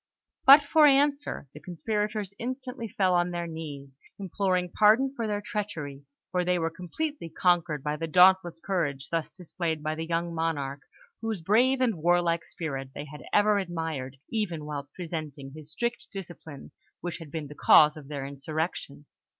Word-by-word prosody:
But 280 +2 +10
for 300 +1 +6
answer, 280 - +2
the 150 - -10
conspirators 210 +3 -3
instantly 250 -1 -5
fell 190 -3 +1
on 175 0 +2
their 175 -1 -3
knees, 145 -5 -8 0.2
imploring 185 -2 -1
pardon 225 +6 +4
for 230 -3 -2
their 205 -1 -1
treachery; 155 -11 -5 0.3
for 180 0 +1
they 180 0 +1
were 165 -1 -1
completely 180 - -4
conquered 165 -3 +1
by 150 0 -1
the 165 +1 -3
dauntless 180 0 +5
courage 150 -8 -2
thus 165 -2 -1
displayed 170 -3 -4
by 155 0 -1
the 160 +1 -5
young 170 0 -1
monarch, 145 -4 -2 0.4
whose 220 -5 -3
brave 245 +9 +3
and 230 -9 +1
warlike 170 0 +2
spirit 135 -5 -5
they 145 - -5
had 150 0 -10
ever 210 0 +4
admired, 160 -8 -4
even 175 -9 -2
whilst 145 -2 -6
resenting 155 -6 -6
his 155 0 -10
strict 235 +6 -3
discipline, 175 -7 -9 0.3
which 175 0 -4
had 165 -3 -10
been 155 0 -4
the 145 - -9
cause 150 0 +6
of 150 -3 -11
their 140 -2 -5
insurrection. 145 +1 -4
170 Hz, 165 wpm, -28 LUFS, 150-205 Hz, 0.4 s, But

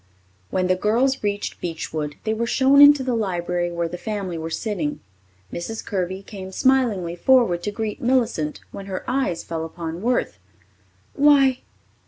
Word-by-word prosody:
When 185 -1 0
the 185 0 +2
girls 235 +8 +1
reached 205 0 -3
Beechwood, 155 -3 -4
they 220 - 0
were 235 +1 -2
shown 270 +3 +5
into 290 -1 +8
the 255 -1 -1
library 175 -5 -1
where 170 0 -2
the 175 +1 -7
family 200 -5 -4
were 160 0 -4
sitting. 165 -5 -3 0.5
Mrs. 220 +6 -5
Kirby 190 -1 -3
came 190 -2 -9
smilingly 215 -8 +1
forward 210 -4 +3
to 210 - -3
greet 215 0 -4
Millicent 235 -12 0
when 200 0 -8
her 190 -1 -4
eyes 255 -10 -1
fell 165 -1 -4
upon 165 +1 -6
Worth. 245 +3 -1 0.7
"Why! 275 -3 +4
200 Hz, 155 wpm, -22 LUFS, 175-245 Hz, 0.7 s, into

